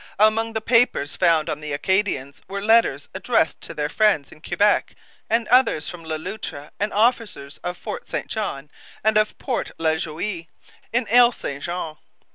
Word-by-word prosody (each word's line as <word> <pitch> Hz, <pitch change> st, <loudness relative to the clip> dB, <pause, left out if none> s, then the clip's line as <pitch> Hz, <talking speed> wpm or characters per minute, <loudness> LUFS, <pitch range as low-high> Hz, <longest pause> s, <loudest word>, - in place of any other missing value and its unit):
Among 225 Hz, +2 st, +3 dB
the 220 Hz, -, -2 dB
papers 230 Hz, -, +2 dB
found 165 Hz, -4 st, +3 dB
on 150 Hz, -, -3 dB
the 150 Hz, -1 st, -5 dB
Acadians 145 Hz, -4 st, -1 dB
were 200 Hz, +1 st, -4 dB
letters 210 Hz, -9 st, +3 dB
addressed -, -, 0 dB
to -, -, -8 dB
their 150 Hz, -1 st, -1 dB
friends 180 Hz, -4 st, +2 dB
in 155 Hz, -, -16 dB
Quebec 205 Hz, +5 st, +1 dB, 0.3 s
and 230 Hz, 0 st, +1 dB
others 250 Hz, -, +3 dB
from 175 Hz, -2 st, -9 dB
Le 160 Hz, -1 st, -3 dB
Loutre 155 Hz, -4 st, -7 dB
and 205 Hz, +1 st, 0 dB
officers 210 Hz, -, 0 dB
of 180 Hz, 0 st, -3 dB
Fort -, -, -7 dB
St -, -, -3 dB
John 150 Hz, -10 st, -4 dB, 0.3 s
and 220 Hz, +1 st, +3 dB
of 215 Hz, 0 st, +2 dB
Port 255 Hz, -4 st, -2 dB
La 160 Hz, -1 st, +1 dB
Joie 165 Hz, +2 st, -4 dB, 0.4 s
in 245 Hz, +1 st, +1 dB
Ile 245 Hz, 0 st, +7 dB
St 140 Hz, -, -6 dB
Jean. 170 Hz, -3 st, -4 dB
190 Hz, 170 wpm, -23 LUFS, 155-220 Hz, 0.4 s, Ile